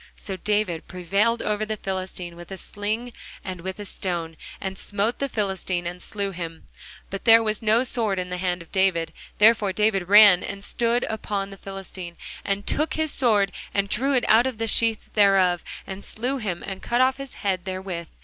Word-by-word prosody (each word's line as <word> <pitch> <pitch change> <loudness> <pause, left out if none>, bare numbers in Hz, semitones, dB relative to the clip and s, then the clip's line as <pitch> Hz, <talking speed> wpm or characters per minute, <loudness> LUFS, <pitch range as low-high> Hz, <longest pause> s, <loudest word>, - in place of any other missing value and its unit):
So 195 - -5
David 205 -4 0
prevailed 200 +6 +1
over 210 0 0
the 215 0 -3
Philistine 185 -3 -4
with 175 0 -11
a 190 - -6
sling 215 +5 -3 0.3
and 185 -3 -6
with 190 +1 -5
a 205 - -5
stone, 170 -4 -3 0.2
and 190 0 -4
smote 205 +4 -1
the 275 - -1
Philistine, 190 -5 -2
and 180 +1 -5
slew 200 0 -3
him; 165 -3 -7 0.5
but 195 - -5
there 225 0 +8
was 215 -1 -1
no 225 +2 +3
sword 225 -6 0
in 180 0 -3
the 180 - -3
hand 180 -1 -1
of 165 - -24
David. 170 -4 +1 0.2
Therefore 215 -2 +5
David 195 -2 +1
ran, 205 -3 +8
and 200 0 -6
stood 235 +3 +1
upon 200 -2 -3
the - - -8
Philistine, 190 -3 -8 0.3
and 200 0 -1
took 305 +2 0
his 315 -1 0
sword, 210 -6 +2 0.2
and 200 0 +1
drew 270 +7 +1
it 245 - +2
out 230 +4 +6
of 255 -4 -4
the 225 - -1
sheath 225 0 +1
thereof, 195 -4 +4 0.2
and 195 +1 -7
slew 250 +5 -3
him, 190 -7 -3
and 195 -1 -6
cut 240 - 0
off 260 +1 +4
his 275 -1 -8
head 190 -3 -1
therewith. 185 -3 -5
200 Hz, 195 wpm, -24 LUFS, 185-220 Hz, 0.5 s, there